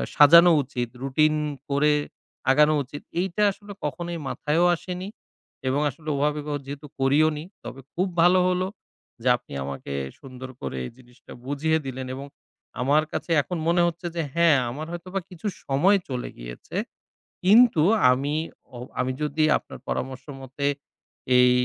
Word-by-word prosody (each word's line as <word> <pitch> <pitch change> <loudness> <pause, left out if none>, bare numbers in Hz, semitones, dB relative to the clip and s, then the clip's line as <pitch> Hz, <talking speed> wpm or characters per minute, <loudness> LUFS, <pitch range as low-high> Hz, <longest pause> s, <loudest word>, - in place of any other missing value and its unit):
সাজানো 170 +4 +8
উচিত, 125 -3 -4
রুটিন 155 +3 +3 0.3
করে 145 +2 +3 0.6
আগানো 150 +3 +5
উচিত, 145 +3 -9 0.2
এইটা 190 +2 -2
আসলে 205 +1 -11
কখনোই 170 +4 -4
মাথায়ও 155 +5 +1
আসেনি। 185 +2 -6 0.6
এবং 130 +2 +1
আসলে 155 +3 -8
ওভাবে 150 +1 0
বাও 145 -1 -1
যেহেতু 140 +2 -7
করিও 140 +4 +4
নি, 150 - -6 0.2
তবে 120 +3 -8
খুব 185 +3 0
ভালো 180 +2 +6
হলো, 185 +1 0 0.5
যে 125 - -2
আপনি - - -14
আমাকে 70 0 -6 0.3
সুন্দর 130 -1 -9
করে - - -4
এই - - -7
জিনিসটা 125 -1 -18
বুঝিয়ে 150 +4 +1
দিলেন। 130 -1 -5
এবং 135 +1 -7 0.6
আমার 145 +4 +3
কাছে - - -4
এখন 180 +5 -5
মনে 175 +1 +3
হচ্ছে 170 +1 -4
যে, 170 - 0
হ্যাঁ, 170 -3 +5
আমার 145 +6 -5
হয়তোবা 185 +3 -4
কিছু 180 +2 -6 0.2
সময় 165 +10 +4
চলে 125 -2 -3
গিয়েছে। - - -9 0.7
কিন্তু 215 -2 +6 0.3
আমি, 140 +4 0 0.4
ও - - -7 0.2
আমি 125 +1 +1
যদি 150 +1 0
আপনার - - -11
পরামর্শ 130 0 -4 0.2
মতে 135 +2 -5 0.7
এই 125 0 +6
150 Hz, 150 wpm, -25 LUFS, 130-170 Hz, 0.7 s, সাজানো